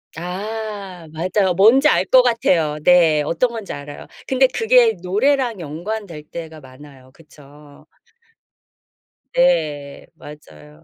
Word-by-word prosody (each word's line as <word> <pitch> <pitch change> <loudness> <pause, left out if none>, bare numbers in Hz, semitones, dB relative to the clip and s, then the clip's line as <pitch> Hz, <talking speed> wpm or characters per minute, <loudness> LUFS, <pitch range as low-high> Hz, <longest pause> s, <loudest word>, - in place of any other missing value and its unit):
아. 195 0 -7
맞아요. 185 +3 0
뭔지 230 +10 +5
알 - - +2
것 260 - +5
같아요. 175 -11 +1
네. 165 -4 +4
어떤 170 +12 0
건지 225 -4 -7
알아요. 145 0 -10 0.2
근데 265 0 +3
그게 460 - +3
노래랑 240 +4 0
연관될 170 +1 -7
때가 160 0 -9
많아요, 135 -1 -16
그쵸? 145 -2 -18 1.5
네. 155 - 0
맞아요. 75 - -15
175 Hz, 220 characters per minute, -19 LUFS, 150-220 Hz, 1.5 s, 뭔지